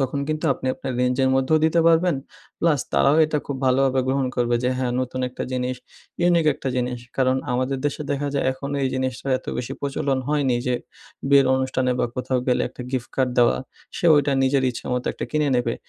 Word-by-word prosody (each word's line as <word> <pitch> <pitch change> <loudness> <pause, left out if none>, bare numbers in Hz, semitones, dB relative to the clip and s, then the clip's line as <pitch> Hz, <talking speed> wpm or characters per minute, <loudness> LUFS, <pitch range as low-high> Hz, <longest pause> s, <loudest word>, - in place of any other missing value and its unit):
তখন 135 +1 -1
কিন্তু 155 +1 -2
আপনি 130 - -7
আপনার 130 - -5
রেঞ্জ 125 0 +1
এর 130 - +3
মধ্যেও 135 +4 +3
দিতে 165 +1 +3
পারবেন। 165 -1 +4 0.4
প্লাস 155 -5 +2
তারাও 75 - +4
এটা 155 -1 -1
খুব 140 - -3
ভালোভাবে 130 0 +3
গ্রহণ 135 0 +1
করবে 120 -1 +1
যে, 125 - +1
"হ্যাঁ, 125 -2 -1
নতুন 130 0 -3
একটা 125 - -6
জিনিস, 125 0 -2 0.4
ইউনিক 170 -2 +3
একটা 135 - -5
জিনিস।" 125 0 -1 0.2
কারণ 130 -1 +2 0.2
আমাদের 130 +2 -1
দেশে 145 +1 -3
দেখা 145 0 -1
যায়, 140 - 0
এখন 140 +1 -7
এই 135 - +2
জিনিসটার 130 +1 -2
এত - - -20
বেশি 125 +2 -4
প্রচলন 140 -1 -1
হয়নি, 140 -5 +1
যে, 125 - +1 0.5
বিয়ের 140 -1 +6
অনুষ্ঠানে 130 -1 0
বা - - +2
কোথাও 125 0 -1
গেলে 125 - +2
একটা - - -9
গিফট 130 -2 -3
কার্ড 130 -2 +2
দেওয়া, 120 -1 +4 0.4
সে 175 - 0
ওইটা 145 0 +2
নিজের 135 0 +2
ইচ্ছে 120 - -8
মতো 125 0 -2
একটা - - -5
কিনে 150 -1 +1
নেবে। 120 -1 0
130 Hz, 205 wpm, -23 LUFS, 125-140 Hz, 0.5 s, বিয়ের